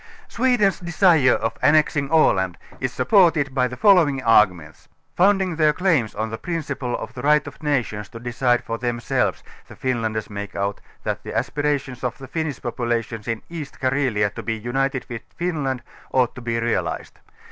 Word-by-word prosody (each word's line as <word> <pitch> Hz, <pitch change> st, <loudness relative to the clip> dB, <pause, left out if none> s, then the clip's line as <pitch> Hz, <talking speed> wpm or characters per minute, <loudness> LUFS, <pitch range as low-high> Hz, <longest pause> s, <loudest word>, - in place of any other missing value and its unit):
Sweden's 240 Hz, -5 st, +2 dB
desire 170 Hz, -6 st, +4 dB
of 115 Hz, +1 st, -2 dB
annexing 150 Hz, -2 st, +3 dB
Aland 95 Hz, -, +3 dB, 0.2 s
is 130 Hz, -1 st, -2 dB
supported 165 Hz, -, +3 dB
by 130 Hz, -2 st, +2 dB
the 125 Hz, 0 st, -8 dB
following 175 Hz, -10 st, +5 dB
arguments: 90 Hz, -9 st, +2 dB, 0.3 s
founding 190 Hz, -2 st, +3 dB
their 155 Hz, -2 st, +4 dB
claims 155 Hz, -, +1 dB
on 110 Hz, 0 st, -3 dB
the 110 Hz, -, -5 dB
prin 170 Hz, -2 st, -3 dB
ciple 125 Hz, -4 st, -3 dB
of -, -, -7 dB
the 125 Hz, -, -7 dB
right 150 Hz, +2 st, +3 dB
of 145 Hz, -2 st, -11 dB
nations 125 Hz, -9 st, -1 dB
to 115 Hz, -, -9 dB
decide 120 Hz, +1 st, 0 dB
for 115 Hz, 0 st, -4 dB
themselves, 120 Hz, -1 st, -1 dB, 0.2 s
the -, -, -12 dB
Finlanders' 115 Hz, -4 st, -2 dB
make 100 Hz, -1 st, -7 dB
out, 100 Hz, +1 st, -2 dB, 0.2 s
that -, -, -2 dB
the -, -, -5 dB
aspirations 145 Hz, -4 st, -2 dB
of 125 Hz, -1 st, -2 dB
the 135 Hz, -, -10 dB
Finnish 160 Hz, 0 st, -3 dB
population 120 Hz, -2 st, -2 dB
in 115 Hz, -1 st, -3 dB
East 160 Hz, -4 st, -8 dB
Carelia 130 Hz, -6 st, +1 dB
to -, -, -6 dB
be 110 Hz, -, -2 dB
united 130 Hz, +3 st, -2 dB
with 115 Hz, -2 st, -6 dB
Finland, 145 Hz, -8 st, -2 dB, 0.3 s
ought 125 Hz, -2 st, +2 dB
to 125 Hz, -, -10 dB
be 115 Hz, -1 st, -1 dB
realized. 115 Hz, 0 st, -2 dB
130 Hz, 170 wpm, -22 LUFS, 115-155 Hz, 0.3 s, following